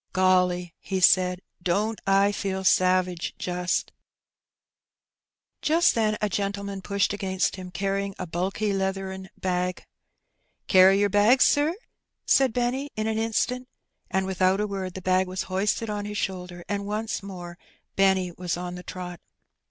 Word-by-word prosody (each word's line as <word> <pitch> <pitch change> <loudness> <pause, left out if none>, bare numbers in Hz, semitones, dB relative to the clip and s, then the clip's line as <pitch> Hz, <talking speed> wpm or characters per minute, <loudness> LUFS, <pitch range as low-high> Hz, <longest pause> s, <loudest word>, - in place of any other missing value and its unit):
'' - - -47
Golly/' 180 -2 +2
he 190 -1 -3
said, 180 0 +4
" - - -53
don't 215 +4 0
I 195 +1 +4
feel 190 -2 -3
savage, 185 -2 +2
jnst 180 -1 -1 0.9
!" - - -65
Jast 335 +3 +4
then 215 -2 +1
a 210 - +1
gentleman 200 0 -3
pushed 200 +1 0
against 190 -2 -1
him^ 185 -1 -8
carrying 195 0 -2
a 185 - -4
bulky 190 +5 -1
leathern 190 0 -3
bag. 180 -1 -2 0.8
"Carry 190 +1 +6
yer 205 - +3
bag, 205 +6 +4
sir?" 295 +6 +4 0.5
said 270 -2 +4
Benny 250 +4 -1
in 215 - -2
an 220 0 0
instant; 250 +3 -1 0.4
and, 190 0 0
without 190 0 +2
a 210 - +1
word, 190 -3 -4
the 190 - -7
bag 185 0 +2
was 185 +1 -3
hoisted 210 +4 0
on 205 -1 -3
his 210 0 -5
shoulder, 180 -3 -4
and 200 -1 -3
once 215 +2 -2
more 180 -3 -9 0.4
Benny 190 -2 +3
was 175 -1 -3
on 180 0 -5
the 180 - -7
trot. 180 -1 -7
190 Hz, 155 wpm, -26 LUFS, 185-205 Hz, 0.9 s, Carry